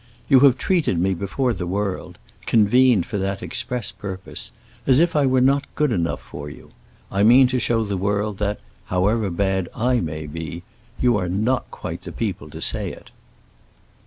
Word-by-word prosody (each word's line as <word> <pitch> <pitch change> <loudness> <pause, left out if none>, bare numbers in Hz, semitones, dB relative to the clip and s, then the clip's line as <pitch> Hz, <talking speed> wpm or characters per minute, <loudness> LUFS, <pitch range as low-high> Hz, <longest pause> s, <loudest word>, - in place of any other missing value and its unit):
You 135 -3 +6
have 135 -1 +6
treated 170 - +1
me 95 +3 +2
before 110 +7 -1
the 90 -3 -4
world—convened 105 +3 +1
for 105 - -3
the 95 0 -1
express 125 -2 -4
purpose—as 100 +6 -3
if 170 0 +2
I 145 -2 +4
were 130 -1 +3
not 140 +2 +3
good 150 -3 +1
enough 85 -6 -1
for 75 0 -8
you. - - -13 0.4
I 100 - 0
mean 120 +5 +7
to 130 0 0
show 115 -2 +1
the 100 -2 -2
world 100 0 -1
that, 105 0 -1 0.3
however 100 +3 +1
bad 95 0 -1
I 125 +1 +2
may 75 -4 -4
be, 80 +3 -6 0.4
you 120 -3 +3
are 90 -2 -2
not 110 +7 0
quite - - -6
the - - -8
people 95 -9 -4
to 80 +2 -9
say - - -2
it." - - -13
105 Hz, 170 wpm, -22 LUFS, 95-125 Hz, 0.4 s, mean